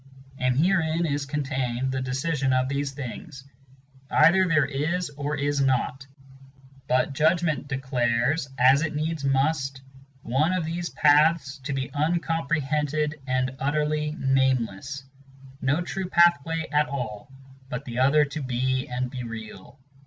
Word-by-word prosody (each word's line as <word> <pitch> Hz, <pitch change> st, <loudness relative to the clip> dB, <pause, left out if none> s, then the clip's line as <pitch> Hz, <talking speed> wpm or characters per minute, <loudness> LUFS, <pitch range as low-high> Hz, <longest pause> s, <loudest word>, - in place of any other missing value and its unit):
And 125 Hz, 0 st, +1 dB
herein 165 Hz, 0 st, +2 dB
is 145 Hz, -2 st, -2 dB
contained 130 Hz, -3 st, -2 dB
the 130 Hz, 0 st, -2 dB
decision 135 Hz, +1 st, -1 dB
of 130 Hz, 0 st, +2 dB
these 140 Hz, 0 st, -2 dB
things; 135 Hz, -, -8 dB, 0.7 s
Either 190 Hz, +2 st, +5 dB
there 155 Hz, -4 st, +3 dB
is 150 Hz, +5 st, -2 dB
or 145 Hz, +1 st, -3 dB
is 145 Hz, 0 st, 0 dB
not; 135 Hz, 0 st, 0 dB, 0.8 s
but 130 Hz, +2 st, +1 dB
Judgment 160 Hz, 0 st, +1 dB
declares, 130 Hz, 0 st, 0 dB
as 130 Hz, +3 st, +5 dB
it 155 Hz, -2 st, -2 dB
needs 155 Hz, 0 st, -2 dB
must, 135 Hz, 0 st, 0 dB, 0.4 s
One 145 Hz, +9 st, +1 dB
of 180 Hz, -3 st, -1 dB
these 170 Hz, +2 st, -3 dB
paths 150 Hz, -1 st, +3 dB
to 140 Hz, +2 st, -4 dB
be 135 Hz, -1 st, -3 dB
uncomprehended 150 Hz, -2 st, -1 dB
and 130 Hz, 0 st, 0 dB
utterly 150 Hz, +1 st, 0 dB
nameless, 130 Hz, -, 0 dB, 0.6 s
No 145 Hz, +6 st, +1 dB
true 185 Hz, +1 st, -4 dB
pathway 165 Hz, -2 st, +3 dB
at 150 Hz, 0 st, +2 dB
all, 125 Hz, -3 st, -5 dB, 0.4 s
but 130 Hz, +2 st, -5 dB
the 120 Hz, -1 st, -4 dB
other 145 Hz, +3 st, +4 dB
to 145 Hz, +2 st, -6 dB
be 130 Hz, 0 st, -1 dB
and 125 Hz, 0 st, -3 dB
be 125 Hz, -, -5 dB
real. 115 Hz, +2 st, -9 dB
140 Hz, 135 wpm, -25 LUFS, 130-155 Hz, 0.8 s, Either